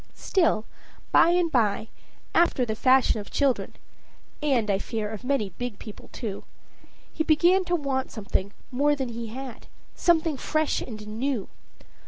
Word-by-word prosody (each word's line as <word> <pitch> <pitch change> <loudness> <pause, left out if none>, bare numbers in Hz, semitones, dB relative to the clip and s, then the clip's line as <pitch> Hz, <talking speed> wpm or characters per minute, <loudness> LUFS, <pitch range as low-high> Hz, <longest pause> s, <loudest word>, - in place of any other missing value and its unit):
Still, 330 - +1 0.5
by - - +6
and 345 -1 +2
by, 220 -3 +1 0.4
after 330 -7 +3
the 220 - -2
fashion 255 0 +4
of 205 - -8
children, 275 -3 0 0.7
and 265 -7 +2
I 195 - +1
fear, 220 -1 -3
of 220 +2 -7
many 250 -7 0
big 245 -4 -4
people 210 0 -11
too, 210 -5 -5 0.7
he 315 - 0
began 345 +4 +4
to 350 0 +1
want 275 -4 -1
something 200 -2 -2 0.2
more 290 +3 +2
than 265 -3 -3
he 235 0 -5
had, 255 +1 -8 0.3
something 325 -4 +2
fresh 310 +2 0
and 215 -3 -7
new. 230 0 -2
255 Hz, 150 wpm, -26 LUFS, 220-300 Hz, 0.7 s, by